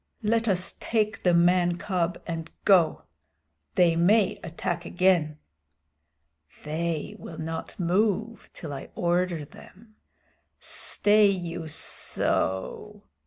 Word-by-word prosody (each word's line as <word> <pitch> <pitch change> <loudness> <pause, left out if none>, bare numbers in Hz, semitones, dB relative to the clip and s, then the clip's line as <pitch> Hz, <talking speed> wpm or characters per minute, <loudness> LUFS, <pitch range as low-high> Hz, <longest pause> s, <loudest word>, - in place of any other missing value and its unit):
"Let 230 +2 +1
us 185 -2 +1
take 215 -1 -1
the 180 -2 +3
man 175 0 +3
cub 180 -2 -2
and 165 -1 -5 0.2
go. 180 -6 +4 0.7
They 170 -2 +4
may 195 +5 +3
attack 170 +1 -4
again." 175 -4 +1 1.3
"They 160 0 -3
will 160 - -9
not 160 +3 -6
move 210 +5 0
till 155 -4 -8
I 135 - -8
order 175 -2 0
them. 215 +8 -17 0.6
Stay 210 0 +3
you 175 -4 -3
sssso!" 95 -9 -1
175 Hz, 105 wpm, -26 LUFS, 165-200 Hz, 1.3 s, go